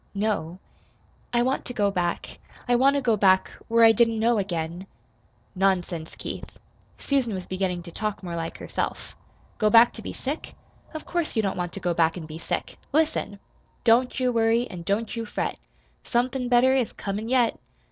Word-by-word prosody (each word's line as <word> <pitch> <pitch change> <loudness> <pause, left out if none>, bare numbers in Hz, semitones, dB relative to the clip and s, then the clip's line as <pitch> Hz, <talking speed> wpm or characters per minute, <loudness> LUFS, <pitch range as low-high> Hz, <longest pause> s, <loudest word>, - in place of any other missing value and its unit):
"No." 200 -5 -1 0.7
"I 240 0 +2
want 260 +2 0
to 245 - -6
go 205 -1 +2
back 175 -3 -2 0.3
I 245 - +3
want 270 +3 +4
to 280 - 0
go 230 -3 +3
back, 190 -2 +4 0.2
where 230 0 +5
I 225 - +8
didn't 230 0 +3
know 225 0 +2
again." 175 -1 -3 0.7
"Nonsense, 180 -4 0
Keith!" - - -7 0.4
(Susan 260 -7 0
was 185 -1 -5
beginning 185 -2 -2
to 170 - -9
talk 210 +1 -3
more 175 -2 -4
like 165 0 -4
herself.) - - -4 0.4
"Go 215 - +4
back 230 +2 +7
to 225 - -9
be - - -6
sick? 285 +4 -5 0.4
Of 315 - -6
course 340 -5 -2
you 220 - +2
don't 195 - -1
want 175 -1 -3
to - - -5
go 175 -2 0
back 165 0 +2
an' 165 - -6
be 155 +1 -8
sick! - - -4
Listen! 300 -9 0 0.5
Don't 245 +2 +3
you 255 -1 +2
worry, 230 +1 +2
an' 180 -3 -7
don't 205 +7 -1
you 230 - -3
fret. 220 - -3 0.4
Somethin' 250 +1 0
better 250 +1 +5
is 260 -4 +1
comin' 210 +3 -4
yet. 245 -3 +2
220 Hz, 185 wpm, -25 LUFS, 185-245 Hz, 0.7 s, I